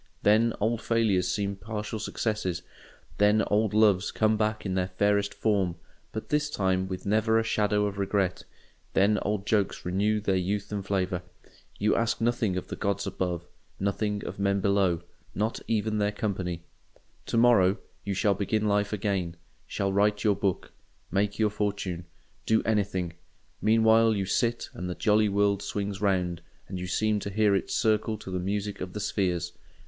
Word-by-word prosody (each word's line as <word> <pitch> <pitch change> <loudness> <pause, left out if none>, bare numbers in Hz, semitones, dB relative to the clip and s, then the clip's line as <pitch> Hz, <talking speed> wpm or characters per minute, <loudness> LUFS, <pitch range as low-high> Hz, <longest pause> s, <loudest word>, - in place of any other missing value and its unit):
Then 110 +2 +4
old 115 +2 0
failures 110 -6 +2
seem 100 0 -1
partial 105 +2 -5
successes, 105 -5 -2 0.6
then 105 +1 +4
old 105 0 +3
loves 105 -3 +4
come 110 0 +2
back 110 0 -1
in 95 - -1
their 90 -1 0
fairest 100 +2 +1
form, 100 -6 0 0.4
but 110 - -6
this 150 0 +1
time 95 -7 0
with 95 -1 -6
never 110 +2 +2
a 115 - +3
shadow 105 -2 +1
of 100 -1 -3
regret, 100 -2 0 0.5
then 100 +2 +3
old 105 -1 -2
jokes 105 -4 0
renew 100 +4 +1
their 100 -2 0
youth 100 +3 -1
and 100 -1 -2
flavour. 95 -2 -1 0.6
You 105 +1 +2
ask 115 -1 0
nothing 115 -5 +1
of 90 - -4
the - - -4
gods 100 0 -1
above, 85 -2 -2 0.3
nothing 100 +1 -1
of - - -6
men 100 0 +2
below—not 100 +2 -1
even 110 -1 0
their 105 0 +1
company. 95 -5 -3 0.6
To - - -1
morrow 115 -5 +5 0.3
you 100 -1 -2
shall 100 +1 +3
begin 105 +2 0
life 105 0 +1
again: 95 -5 -1 0.3
shall 100 -1 -1
write 105 +1 +2
your 105 -3 +3
book, 100 -2 -2 0.4
make 100 +1 0
your 110 -1 +2
fortune, 100 -4 -2 0.4
do 110 0 +3
anything; 95 -5 0 0.5
meanwhile 110 0 +4
you 100 -1 -1
sit, 115 +5 0
and 90 0 -5
the 90 - -3
jolly 105 -1 +3
world 100 0 +2
swings 100 -1 -3
round, 90 -4 0 0.3
and 95 - -5
you 90 - -4
seem 105 +3 +1
to 100 - -5
hear 105 0 +3
it 95 - 0
circle 110 -1 +1
to 95 - -9
the 90 - -1
music 100 +2 -3
of 90 0 -5
the 105 - -4
spheres. 90 -4 -1
100 Hz, 170 wpm, -28 LUFS, 95-110 Hz, 0.6 s, morrow